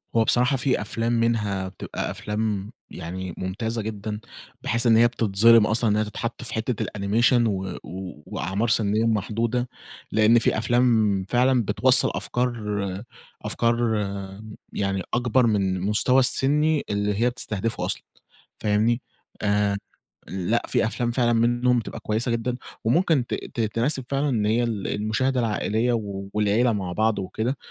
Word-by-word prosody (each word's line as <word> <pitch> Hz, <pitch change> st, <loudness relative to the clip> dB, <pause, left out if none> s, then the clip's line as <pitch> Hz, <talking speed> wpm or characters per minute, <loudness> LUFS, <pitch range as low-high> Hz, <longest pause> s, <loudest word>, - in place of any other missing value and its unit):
هو 115 Hz, -, +5 dB
بصراحة 125 Hz, +4 st, +3 dB
في 130 Hz, -2 st, +1 dB
أفلام 115 Hz, +2 st, -2 dB
منها 105 Hz, -5 st, 0 dB
بتبقى 95 Hz, -, -5 dB
أفلام 105 Hz, -1 st, -3 dB, 0.2 s
يعني 90 Hz, +2 st, -6 dB
ممتازة 110 Hz, +5 st, -3 dB
جدًا، 105 Hz, 0 st, -5 dB, 0.4 s
بحيث 120 Hz, +1 st, 0 dB
إن 115 Hz, -1 st, +6 dB
هي 120 Hz, +1 st, +6 dB
بتتظلِم 115 Hz, -1 st, +4 dB
أصلًا 110 Hz, +1 st, +2 dB
إن 105 Hz, -, +2 dB
هي 110 Hz, -, +2 dB
تتحط 110 Hz, +3 st, -5 dB
في 115 Hz, -, -2 dB
حِتّة 115 Hz, +1 st, -2 dB
الanimation 115 Hz, +4 st, +2 dB
و 95 Hz, -3 st, -3 dB, 0.5 s
وأعمار 95 Hz, +7 st, -2 dB
سِنية 110 Hz, 0 st, +2 dB
محدودة. 115 Hz, +3 st, -1 dB, 0.4 s
لأن 110 Hz, +2 st, +5 dB
في 115 Hz, -, +1 dB
أفلام 110 Hz, -4 st, +2 dB
فعلًا 125 Hz, 0 st, +3 dB
بتْوصَّل -, -, +5 dB
أفكار 105 Hz, -6 st, -2 dB, 0.4 s
أفكار 115 Hz, 0 st, 0 dB, 1.0 s
يعني 95 Hz, -1 st, -1 dB
أَكْبر 120 Hz, +1 st, +2 dB
من 100 Hz, -4 st, +1 dB
المستوى 105 Hz, +7 st, +2 dB
السِني 150 Hz, +4 st, +2 dB
اللي 105 Hz, 0 st, 0 dB
هي 120 Hz, -, +4 dB
بتستهدفه 115 Hz, -2 st, -3 dB
أصلًا، -, -, -2 dB, 0.6 s
فاهمني؟ 110 Hz, +3 st, +1 dB, 0.4 s
آآ 105 Hz, -1 st, +1 dB, 0.5 s
لأ 95 Hz, +6 st, -1 dB
في -, -, +1 dB
أفلام 120 Hz, +1 st, -2 dB
فعلًا 120 Hz, -1 st, +2 dB
مِنّهم 120 Hz, +2 st, +2 dB
بتبقى 115 Hz, -, -6 dB
كويسة 110 Hz, +3 st, -1 dB
جدًا، 115 Hz, +1 st, -1 dB, 0.3 s
وممكن 145 Hz, +1 st, +2 dB
ت -, -, -3 dB
ت -, -, -6 dB
تِنَاسب 115 Hz, +5 st, 0 dB
فعلًا 140 Hz, +1 st, 0 dB
إن 110 Hz, -6 st, 0 dB
هي 115 Hz, +3 st, +2 dB
ال 110 Hz, -5 st, -2 dB
المشاهدة 115 Hz, +5 st, 0 dB
العائلية 115 Hz, +1 st, 0 dB, 0.4 s
والعِيلّة 105 Hz, +3 st, +2 dB
مع 95 Hz, -4 st, -3 dB
بعض 110 Hz, +3 st, +1 dB
وكده، 110 Hz, +7 st, -2 dB
115 Hz, 140 wpm, -24 LUFS, 105-120 Hz, 1.0 s, إن